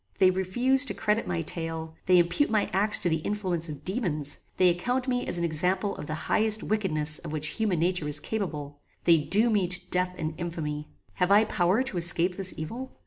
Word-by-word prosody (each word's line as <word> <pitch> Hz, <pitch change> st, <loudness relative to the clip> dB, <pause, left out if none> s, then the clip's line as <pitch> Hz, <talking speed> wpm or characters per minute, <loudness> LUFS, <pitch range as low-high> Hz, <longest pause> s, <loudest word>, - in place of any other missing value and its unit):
"They 185 Hz, -1 st, +5 dB
refuse 240 Hz, +9 st, +3 dB
to -, -, -2 dB
credit 210 Hz, +1 st, 0 dB
my 175 Hz, -2 st, -2 dB
tale; 165 Hz, 0 st, -3 dB
they 180 Hz, -1 st, +5 dB
impute 175 Hz, +11 st, +2 dB
my 215 Hz, -2 st, 0 dB
acts 210 Hz, +2 st, +2 dB
to -, -, -2 dB
the 160 Hz, -1 st, +1 dB
influence 180 Hz, -3 st, -2 dB
of 145 Hz, 0 st, -9 dB
daemons; 165 Hz, -, -2 dB, 0.2 s
they 185 Hz, -1 st, +5 dB
account 245 Hz, +9 st, -1 dB
me 250 Hz, -1 st, -1 dB
an 170 Hz, -, -2 dB
example 180 Hz, +5 st, -1 dB
of -, -, -7 dB
the 155 Hz, -, -3 dB
highest 220 Hz, 0 st, +2 dB
wickedness 155 Hz, -8 st, 0 dB
of -, -, -8 dB
which 155 Hz, 0 st, -1 dB
human 210 Hz, -5 st, +1 dB
nature 175 Hz, -1 st, 0 dB
is 150 Hz, 0 st, +1 dB
capable; 150 Hz, -8 st, -5 dB, 0.2 s
they 165 Hz, -2 st, +5 dB
doom 215 Hz, +9 st, +2 dB
me 195 Hz, -4 st, +2 dB
to 180 Hz, +1 st, +2 dB
death 180 Hz, 0 st, +2 dB
and 155 Hz, 0 st, -3 dB
infamy. 155 Hz, -3 st, -4 dB, 0.3 s
Have 180 Hz, -1 st, +1 dB
I 205 Hz, +2 st, +6 dB
power 190 Hz, +3 st, +1 dB
to 265 Hz, -8 st, -2 dB
escape 175 Hz, +1 st, +2 dB
this 190 Hz, -1 st, -1 dB
evil? 235 Hz, +12 st, -7 dB
180 Hz, 200 wpm, -27 LUFS, 160-210 Hz, 0.3 s, I